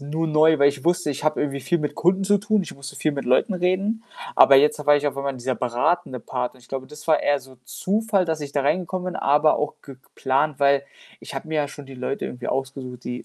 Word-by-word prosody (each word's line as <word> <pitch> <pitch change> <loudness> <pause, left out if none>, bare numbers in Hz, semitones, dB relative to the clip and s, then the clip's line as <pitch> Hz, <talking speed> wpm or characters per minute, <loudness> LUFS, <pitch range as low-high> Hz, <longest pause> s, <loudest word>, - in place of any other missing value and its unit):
nur 155 +3 -2
neu, 155 0 +4
weil 140 0 +6
ich 140 -2 -4
wusste, 175 -2 +1
ich 140 0 -5
habe 155 - +1
irgendwie 140 -1 -2
viel 175 +6 0
mit 150 -1 -3
Kunden 185 +3 +2
zu 205 +1 +4
tun, 210 0 +1
ich - - -8
musste 140 0 -10
viel 155 - 0
mit 140 - -4
Leuten 130 - +2
reden, 185 +5 0 0.3
aber 135 - +8
jetzt 150 +2 +3
war 145 0 +6
ich 145 0 -1
auf 140 -1 -2
einmal 140 0 -2
in 130 - -10
dieser 130 +1 -2
beratende 125 +5 -1
Part. 125 +1 -4
Und 130 - -19
ich 120 - -21
glaube, 135 -1 -5
das 150 0 -12
war 155 - +4
eher 145 -1 +2
so 130 0 -16
Zufall, 205 - 0
dass 160 -2 -2
ich 145 -1 -6
da 140 - 0
reingekommen 180 +5 -1
bin, - - -2
aber 150 +2 +3
auch 150 0 -2
geplant, 135 +2 -2
weil 140 0 +4 0.4
ich - - -9
habe 135 - -5
mir 160 - -4
ja 145 -1 0
schon 145 -1 -11
die 135 - -11
Leute 125 +2 -3
irgendwie 125 0 -6
ausgesucht, 130 -2 -4
die 125 0 -5
145 Hz, 255 wpm, -23 LUFS, 135-170 Hz, 0.4 s, aber